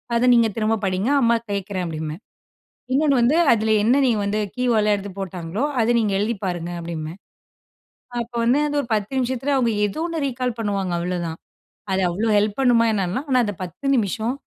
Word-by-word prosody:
அதை 240 +2 +3
நீங்க 230 -1 +5
திரும்ப 220 0 +1
படிங்க, 190 +6 0
அம்மா 235 0 +4 0.2
கேட்கிறேன் 195 -2 -3
அப்படிம்பேன். 155 +3 -5 0.7
இன்னொன்னு 280 0 +3
வந்து 255 +7 +3 0.2
அதில 220 -1 +1
என்ன 245 +5 +4
நீங்க 235 -4 +2
வந்து 205 +1 -1 0.2
கீவேர்ட் 240 -4 +2
ல 210 - +3
எடுத்து 200 0 -7
போட்டாங்களோ 185 +3 -4 0.2
அதை 225 +2 +2
நீங்க 210 -3 +1
எழுதி 220 +3 0
பாருங்க 175 -2 -3
அப்படின்பேன். 165 +1 -6 1.0
அப்போ 235 +1 -7
வந்து 250 +5 +3
அது 290 - -3
ஒரு 240 - -8
10 210 +3 -1
நிமிஷத்தில, 260 +2 -1
அவங்க 235 -3 +2
ஏதோ 205 +10 -4
ஒன்னு 330 -2 -3
ரீகால் 250 -2 -2
பண்ணுவாங்க 200 -4 -1
அவ்வளோதான், 170 -2 -3 0.5
அது 190 0 +1
அவ்வளோ 215 +6 -1
ஹெல்ப் 205 +2 +1
பண்ணுமா 235 -3 +4
என்னலாம், 200 - -2
ஆனா 255 -1 +4
அந்த 205 -2 -4
10 185 - -6
நிமிஷம் 220 +3 -1
215 Hz, 180 wpm, -22 LUFS, 185-245 Hz, 1.0 s, நீங்க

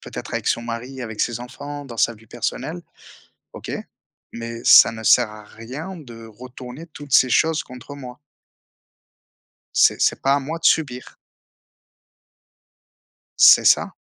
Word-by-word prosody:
peut-être - - -8
avec - - -4
son 115 - 0
mari, 120 +3 -6
avec 110 -3 -6
ses 120 -1 -1
enfants, 145 +4 -8
dans 120 -4 -10
sa 120 - +2
vie 110 +1 -20
personnelle, 90 -4 -5 0.7
OK. - - -9 0.6
Mais 115 0 -7
ça - - +8
ne 110 - -9
sert 115 0 +4
à 105 -1 -12
rien 135 - -9
de 115 -7 -12
retourner 125 +6 -11
toutes 145 -4 -12
ces 130 - +5
choses 160 +4 +2
contre 125 +2 -11
moi. 125 -1 -10 1.6
C'est - - +4
c'est - - +1
pas 135 +1 +3
à 145 - 0
moi 160 +5 -5
de 165 - -16
subir. 135 -7 0 2.3
C'est - - +8
ça. - - +3
125 Hz, 145 wpm, -21 LUFS, 115-145 Hz, 2.3 s, ça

